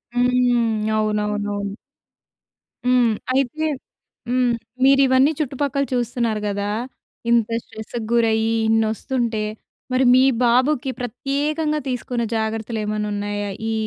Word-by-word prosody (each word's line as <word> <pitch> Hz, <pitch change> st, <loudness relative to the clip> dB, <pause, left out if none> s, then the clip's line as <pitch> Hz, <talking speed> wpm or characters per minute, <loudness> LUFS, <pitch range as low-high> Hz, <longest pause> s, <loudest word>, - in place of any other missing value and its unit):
హ్మ్. 245 Hz, -3 st, +2 dB
అవునవునవును. 210 Hz, -1 st, -1 dB, 1.1 s
హ్మ్. 250 Hz, -2 st, +4 dB, 0.2 s
అయితే 275 Hz, +4 st, 0 dB, 0.6 s
హ్మ్. 250 Hz, 0 st, +2 dB, 0.3 s
మీరు 275 Hz, 0 st, +6 dB
ఇవన్నీ 260 Hz, +3 st, +4 dB
చుట్టుపక్కల 280 Hz, -1 st, -1 dB
చూస్తున్నారు 235 Hz, -3 st, -1 dB
గదా! 205 Hz, 0 st, -2 dB, 0.6 s
ఇంత 235 Hz, -2 st, +4 dB, 0.2 s
స్ట్రెస్‌కి 220 Hz, +2 st, -7 dB
గురయ్యి 225 Hz, -1 st, +2 dB
ఇన్ని 225 Hz, 0 st, +3 dB
వస్తుంటే, 230 Hz, -2 st, -2 dB, 0.5 s
మరి 255 Hz, +1 st, +3 dB
మీ 255 Hz, -, +6 dB, 0.2 s
బాబుకి 255 Hz, +3 st, +2 dB
ప్రత్యేకంగా 295 Hz, +5 st, -1 dB
తీసుకున్న 245 Hz, -1 st, -2 dB
జాగ్రత్తలు 220 Hz, +1 st, -2 dB
ఏమన్నా 210 Hz, 0 st, -2 dB
ఉన్నాయా? 205 Hz, 0 st, -3 dB, 0.2 s
ఈ, -, -, 0 dB
235 Hz, 105 wpm, -21 LUFS, 215-255 Hz, 1.1 s, మీరు